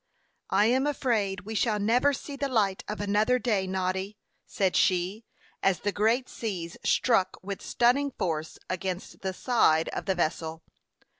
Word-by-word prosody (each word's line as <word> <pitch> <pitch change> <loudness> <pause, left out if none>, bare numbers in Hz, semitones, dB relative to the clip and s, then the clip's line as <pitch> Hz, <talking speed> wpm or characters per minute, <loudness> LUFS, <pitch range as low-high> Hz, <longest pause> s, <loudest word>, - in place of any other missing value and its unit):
"I 205 - +4
am 260 +5 +2
afraid 220 -9 0
we 215 +2 -7
shall 215 0 +1
never 235 +7 +3
see 285 +1 -6
the 280 0 -2
light 205 -6 +1
of 210 - -4
another 210 +4 +2
day, 210 -6 0
Noddy," 190 +2 -2 0.3
said 190 -2 0
she, 185 +5 +1 0.4
as 195 -2 +2
the 205 - 0
great 225 +5 +1
seas 185 -7 -5
struck 195 -7 +2
with 200 0 -5
stunning 255 +4 +2
force 160 -2 -2
against 185 0 -4
the 190 - -2
side 185 -7 +2
of - - -5
the 190 - +2
vessel. 160 -1 -2
205 Hz, 155 wpm, -28 LUFS, 185-235 Hz, 0.4 s, I